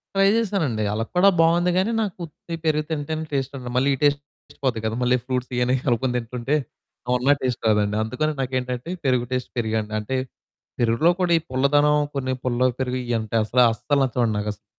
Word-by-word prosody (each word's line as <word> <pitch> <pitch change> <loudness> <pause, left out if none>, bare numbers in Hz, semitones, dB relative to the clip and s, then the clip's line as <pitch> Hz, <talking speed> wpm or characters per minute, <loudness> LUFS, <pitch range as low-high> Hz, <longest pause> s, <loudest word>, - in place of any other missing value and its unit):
Try 195 0 +4
చేసానండి. 180 - 0
అలా 110 +2 -1
కూడా 185 +3 +6
బావుంది 170 +2 +4
గానీ, 190 +5 +2
నాకు 205 -5 -3
ఉత్తి 165 +2 -11
పెరుగు 155 -1 +2
తింటేనే 155 0 -3
టేస్టుండదు. 135 -2 -3
మళ్ళీ 130 +2 +3
ఈ - - -11
టేస్ట్, 145 0 +3 0.3
టేస్ట్ - - -20
పోద్ది 125 -4 +1
గదా 110 0 -1
మళ్ళీ 125 +1 +3
ఫ్రూట్సియన్నీ 125 -1 0
కనుక్కొని 125 +1 +1
తింటుంటే 120 +4 -2 0.6
ఉన్న 130 +3 +4
టేస్ట్ 125 -2 -2
రాదండి. 105 -1 +2
అందుకని 155 +8 -1
నాకేంటంటే 125 +1 -3 0.2
పెరుగు 125 -2 +2
టేస్ట్ 125 -1 -2
పెరుగే 110 -1 0
అండి. 105 0 -9
అంటే 105 +5 -4 0.6
పెరుగులో 120 +8 +3
కూడా 180 -2 +1
ఈ - - +1
పుల్లదనం 145 +3 +3 0.2
కొన్ని 130 -1 -1
పుల్ల 125 -1 -1 0.2
పెరుగు 130 -1 -1
ఇ - - 0
అంటే 110 0 -5
అసల 120 +4 0
అస్సలు 145 +5 0
నచ్చవండి 120 -3 0
నాకు. 105 0 -2
అసలు 100 - -24
130 Hz, 185 wpm, -23 LUFS, 120-150 Hz, 0.6 s, కూడా